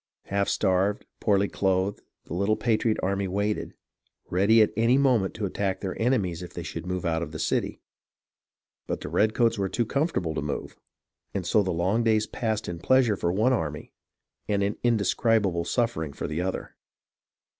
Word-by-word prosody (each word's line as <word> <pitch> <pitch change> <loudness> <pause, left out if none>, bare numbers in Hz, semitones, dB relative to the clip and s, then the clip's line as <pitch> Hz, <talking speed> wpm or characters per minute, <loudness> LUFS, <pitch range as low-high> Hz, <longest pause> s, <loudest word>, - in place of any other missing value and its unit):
Half 100 0 0
starved, 95 +1 +1
poorly 100 -2 +2
clothed, 95 +1 0 0.2
the - - -7
little 100 +4 +1
patriot 110 -1 +1
army 100 +1 0
waited, 100 +3 -2 0.6
ready 105 +5 +5
at - - -1
any 115 +4 +4
moment 125 -9 +2
to 110 - -2
attack 95 0 -2
their 95 -2 -4
enemies 105 -9 +1
if 90 -1 -8
they 85 - -4
should 85 +1 -6
move 90 -1 -3
out 80 -1 0
from 85 - -4
the 80 - -7
city. - - -1 1.1
But - - -3
the - - -5
redcoats 110 +1 +2
were 95 -1 0
too 120 - 0
comfortable 135 - -1
to - - -2
move, 70 0 -4 0.6
and 95 -3 -2
so 105 +4 +3
the 95 - -2
long 95 +7 +1
days 110 -1 +3
passed 110 -1 -2
in 85 -1 -5
pleasure 125 +2 +3
for 85 -2 -1
one 110 +8 +2
army, 75 - -3 0.5
and 100 -1 +1
in 100 +1 0
indescribable 105 -5 +2
suffering 85 - -1
for - - -5
the 75 +3 -2
other. 95 +1 -4
100 Hz, 175 wpm, -26 LUFS, 90-110 Hz, 1.1 s, ready